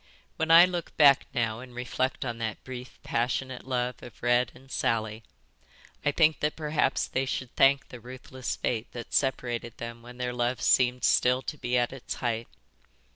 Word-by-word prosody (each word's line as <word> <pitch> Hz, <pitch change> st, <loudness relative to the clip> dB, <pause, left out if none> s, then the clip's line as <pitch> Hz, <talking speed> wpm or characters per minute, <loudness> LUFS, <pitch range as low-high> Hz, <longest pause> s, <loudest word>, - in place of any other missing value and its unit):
"When 160 Hz, 0 st, -1 dB
I 165 Hz, +2 st, +10 dB
look 175 Hz, -2 st, -5 dB
back 140 Hz, -3 st, +6 dB
now 115 Hz, -2 st, -1 dB
and 125 Hz, -1 st, -11 dB
reflect 130 Hz, +2 st, -2 dB
on 120 Hz, -2 st, -4 dB
that 110 Hz, -2 st, -4 dB
brief 125 Hz, -1 st, -8 dB
passionate 125 Hz, +2 st, -2 dB
love 125 Hz, -1 st, -2 dB
of 120 Hz, -, -13 dB
Red 120 Hz, +1 st, +3 dB
and 135 Hz, 0 st, -16 dB
Sally, 110 Hz, -1 st, -1 dB, 0.8 s
I 145 Hz, -, +2 dB
think 155 Hz, 0 st, +3 dB
that 150 Hz, 0 st, 0 dB
perhaps 150 Hz, -1 st, 0 dB
they 130 Hz, +1 st, -1 dB
should 130 Hz, -1 st, -4 dB
thank 135 Hz, 0 st, +4 dB
the 125 Hz, -, -9 dB
ruthless 130 Hz, +1 st, -6 dB
fate 115 Hz, -1 st, -2 dB
that 120 Hz, -1 st, -8 dB
separated 120 Hz, -3 st, -1 dB
them 115 Hz, 0 st, -7 dB
when 120 Hz, +1 st, -12 dB
their 125 Hz, 0 st, -2 dB
love 120 Hz, +1 st, -1 dB
seemed 125 Hz, -1 st, +3 dB
still 125 Hz, +1 st, +3 dB
to -, -, -4 dB
be 125 Hz, -3 st, -1 dB
at 120 Hz, +1 st, +1 dB
its 135 Hz, -, -6 dB
height. 115 Hz, -1 st, -2 dB
125 Hz, 180 wpm, -28 LUFS, 120-135 Hz, 0.8 s, I